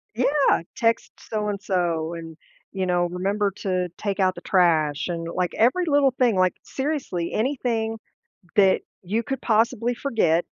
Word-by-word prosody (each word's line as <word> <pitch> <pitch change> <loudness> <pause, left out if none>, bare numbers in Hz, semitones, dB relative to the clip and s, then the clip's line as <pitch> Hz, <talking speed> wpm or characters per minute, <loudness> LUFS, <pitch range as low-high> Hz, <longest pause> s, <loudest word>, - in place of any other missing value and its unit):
Yeah. 270 +4 +3
"Text 230 -2 +1
so 210 -1 -3
and 200 -1 -3
so," 170 -4 -1
and, 165 -1 -8 0.3
you 190 -1 -2
know, 175 -1 +2
"remember 195 +3 0
to 185 -2 -1
take 200 -1 -3
out 185 -1 +2
the - - -9
trash," 160 -5 +2
and, 165 -2 -3
like, 180 +1 -2
every 260 +11 +3
little 285 -3 +4
thing, 245 -4 +2
like, 185 -1 +2
seriously, 265 - -3
anything 225 -2 -1 0.6
that 195 -3 +5 0.2
you 215 +6 -1
could 270 +2 -4
possibly 230 +1 +2
forget, 175 - +1
200 Hz, 155 wpm, -24 LUFS, 175-235 Hz, 0.6 s, that